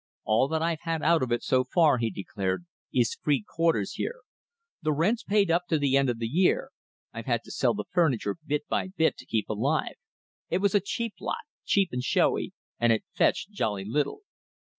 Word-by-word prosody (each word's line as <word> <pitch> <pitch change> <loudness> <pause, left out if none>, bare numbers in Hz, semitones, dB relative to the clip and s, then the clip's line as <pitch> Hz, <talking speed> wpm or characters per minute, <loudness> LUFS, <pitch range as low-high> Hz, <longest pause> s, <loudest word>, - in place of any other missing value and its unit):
"All 110 +5 +3
that 160 +1 -1
I've 165 -1 -1
had 165 -2 -2
out 165 +1 +4
of 130 -2 -1
it 120 - 0
so 130 0 +3
far," 145 0 +3
he 115 -1 0
declared, 95 - -3 0.3
"is 120 -3 +1
free 140 -8 +1
quarters 165 -12 +1
here. - - -4 0.6
The 155 - +1
rent's 185 +11 +1
paid 200 -4 +2
up 175 +1 +1
to 160 - +2
the 140 -2 +2
end 140 -1 +3
of 120 - -1
the 115 - -3
year. 180 - +2 0.4
I've - - -7
had - - +1
to - - -11
sell - - +1
the - - -3
furniture 140 - +1
bit 150 0 -2
by - - 0
bit 175 -4 +1
to - - -12
keep 110 -2 -1
alive. 135 +9 0 0.6
It 175 - +1
was 195 0 +1
a 205 - +5
cheap 230 +3 -3
lot, 460 0 -3 0.2
cheap 195 -3 +3
and 125 - -2
showy, - - +1 0.3
and 120 0 +4
it 110 - +1
fetched 200 - +1
jolly 105 - -2
little. 140 - -1
150 Hz, 205 wpm, -27 LUFS, 120-175 Hz, 0.6 s, a